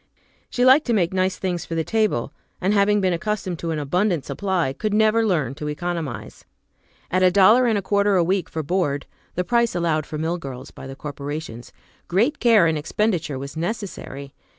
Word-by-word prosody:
She 245 - +1
liked 265 +4 +6
to 240 - +2
make 180 -4 +1
nice 185 0 0
things 180 -3 -2
for 165 - -5
the 165 - 0
table, 220 +3 0 0.3
and, 190 +3 +1
having 205 0 +3
been 185 -2 +2
accustomed 185 -1 -3
to 170 - -4
an 160 - -1
abundant 170 +2 0
supply, 185 -9 -1
could 210 +7 -2
never 220 +1 +4
learn 155 - 0
to 150 +1 -6
economize. 160 -3 -4 0.7
At 185 +1 +2
a 185 - +6
dollar 210 +7 +5
and 220 -3 +2
a 200 - -2
quarter 200 0 +2
a 180 - +4
week 185 0 0
for 160 - -4
board,(the 170 +1 -3
price 235 0 +1
allowed 160 -3 0
for 155 - -5
mill 165 +3 -2
girls 135 -3 -8
by - - -10
the 135 - -8
corporations) 145 -4 -6 0.4
great 230 - +1
care 225 -7 +5
in 160 -1 +1
expenditure 165 -2 -1
was 140 +3 -7
necessary. 165 -7 -5
180 Hz, 190 wpm, -22 LUFS, 155-210 Hz, 0.7 s, liked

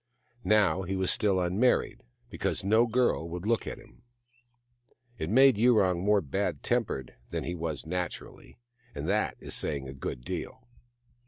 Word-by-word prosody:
Now 100 -5 +4
he 95 +1 -3
was 95 -1 +1
still 100 -3 +2
unmarried, 95 +8 +1 0.3
because - - -2
no 110 +4 +4
girl 115 -8 +1
would 90 +2 -6
look 115 0 0
at - - -5
him. - - -18 1.2
It 80 - -3
made 130 0 +5
Yurong 105 -7 +3
more 105 0 +3
bad 70 - -2
tempered 65 -2 -1 0.2
than - - -3
he 85 - -3
was 80 -3 -4
naturally, 90 +1 -6 0.4
and - - -4
that - - 0
is - - -7
saying 70 -2 -2
a 65 - -7
good 65 -2 -5
deal. 125 - -6
95 Hz, 155 wpm, -29 LUFS, 85-110 Hz, 1.2 s, made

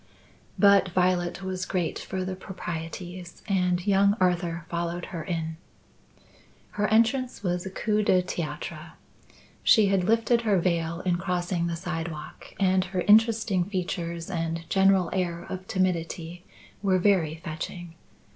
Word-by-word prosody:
But 200 -2 +5
Violet 180 0 +1
was 185 0 -3
great 180 -4 -1
for 190 -1 -4
the 185 0 -3
proprieties 175 -1 -7
and 180 -2 +1
young 200 +1 +4
Arthur 175 -2 0
followed 170 0 -3
her 165 -2 -4
in. 160 -2 -3 1.1
Her 210 0 0
entrance 230 +2 +2
was 180 0 -1
a - - -4
coup 210 +2 0
du 185 -3 +3
theatre. 170 -3 -5 0.7
She 215 -4 +5
had 195 -2 +2
lifted 230 +2 +3
her 210 -4 +2
veil 170 -1 0
in 180 -2 +1
crossing 175 -1 -1
the 170 - -2
sidewalk 165 -3 -6
and 190 -1 +3
her 185 -1 -2
interesting 215 -2 +4
features 175 -3 -4
and 165 -1 -3
general 190 -2 +4
air 175 -2 -2
of 185 0 -6
timidity 175 -1 -2 0.4
were 190 -2 +3
very 180 -5 +2
fetching. 165 +2 -6
180 Hz, 135 wpm, -27 LUFS, 170-195 Hz, 1.1 s, But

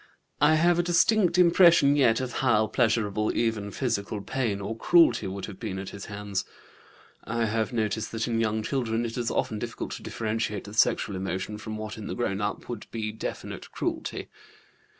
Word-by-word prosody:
I 155 - +6
have 170 +2 +3
a - - +6
distinct 175 +1 +3
impression 170 -5 +6
yet 125 -6 +4
of 125 -2 -4
how 115 -5 +3
pleasurable 110 -2 +1
even 110 -3 0
physical 105 -2 -2
pain 110 -3 -2
or 100 +3 -4
cruelty 165 - +4
would 95 0 -5
have 100 -3 -10
been 105 -5 -4
at 95 0 -5
his 100 - -8
hands. 100 -2 -3 0.8
(I 115 0 -1
have 110 0 -1
noticed 110 -2 -1
that 115 +1 -1
in 115 -1 0
young 110 -1 0
children 120 -2 -1
it 115 - -4
is 120 -2 -1
often 110 - -1
difficult 115 +1 -5
to - - -6
differentiate 110 -2 -2
the 105 - -10
sexual 105 -2 +2
emotions 95 +3 -4
from 110 0 -5
what 110 +1 -6
in 105 - -6
the - - -4
grown 105 -4 -1
up 105 0 -3
would 120 -4 -6
be 110 -2 -3
definite 110 - -6
cruelty.) - - -3
110 Hz, 185 wpm, -27 LUFS, 105-120 Hz, 0.8 s, I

